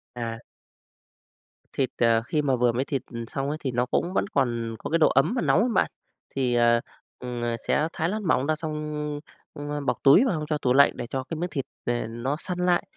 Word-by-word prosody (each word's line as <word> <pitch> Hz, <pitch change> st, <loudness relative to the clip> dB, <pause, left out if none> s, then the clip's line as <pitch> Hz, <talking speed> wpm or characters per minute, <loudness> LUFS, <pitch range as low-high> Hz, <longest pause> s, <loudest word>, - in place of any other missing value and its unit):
À. 115 Hz, -1 st, -4 dB, 1.3 s
Thịt, 135 Hz, -2 st, 0 dB
à, 115 Hz, -1 st, +4 dB
khi 150 Hz, -, +1 dB
mà 135 Hz, -3 st, +2 dB
vừa 120 Hz, -1 st, +3 dB
mới 125 Hz, +3 st, -1 dB
thịt 135 Hz, -2 st, -2 dB, 0.3 s
xong 135 Hz, +3 st, -3 dB
ấy 150 Hz, -, -2 dB
thì 135 Hz, -4 st, -2 dB
nó 125 Hz, +1 st, +1 dB
cũng 175 Hz, +7 st, -1 dB
vẫn -, -, +1 dB
còn 120 Hz, -, -1 dB
có -, -, -5 dB
cái 165 Hz, -, +3 dB
độ 160 Hz, -, +6 dB
ấm -, -, +3 dB
và 245 Hz, -, 0 dB
nóng -, -, +3 dB
ấy 235 Hz, +4 st, +2 dB
bạn, -, -, +2 dB, 0.4 s
thì, 130 Hz, -3 st, +1 dB
à, 120 Hz, 0 st, +4 dB, 0.4 s
ừm, 125 Hz, -1 st, -5 dB
à, 120 Hz, 0 st, 0 dB
sẽ 150 Hz, -, +2 dB
thái 160 Hz, +2 st, -1 dB
lát 215 Hz, +3 st, -2 dB
mỏng 155 Hz, -8 st, +1 dB
ra 155 Hz, -, +2 dB
xong, 150 Hz, -1 st, -4 dB, 0.6 s
a, 145 Hz, 0 st, -4 dB
bọc -, -, +1 dB
túi 140 Hz, -, +7 dB
vào 240 Hz, -, +1 dB
xong 155 Hz, -1 st, -3 dB
cho 150 Hz, -, 0 dB
tủ 125 Hz, -3 st, +1 dB
lạnh 140 Hz, +1 st, +6 dB
để 120 Hz, -, -4 dB
cho 130 Hz, +2 st, -3 dB
cái 165 Hz, +4 st, -6 dB
miếng 175 Hz, +3 st, -2 dB
thịt 135 Hz, -6 st, -3 dB, 0.2 s
nè 120 Hz, 0 st, 0 dB
nó 120 Hz, +5 st, -2 dB
săn 180 Hz, 0 st, -4 dB
lại, 180 Hz, -1 st, +2 dB
135 Hz, 230 wpm, -26 LUFS, 120-155 Hz, 1.3 s, túi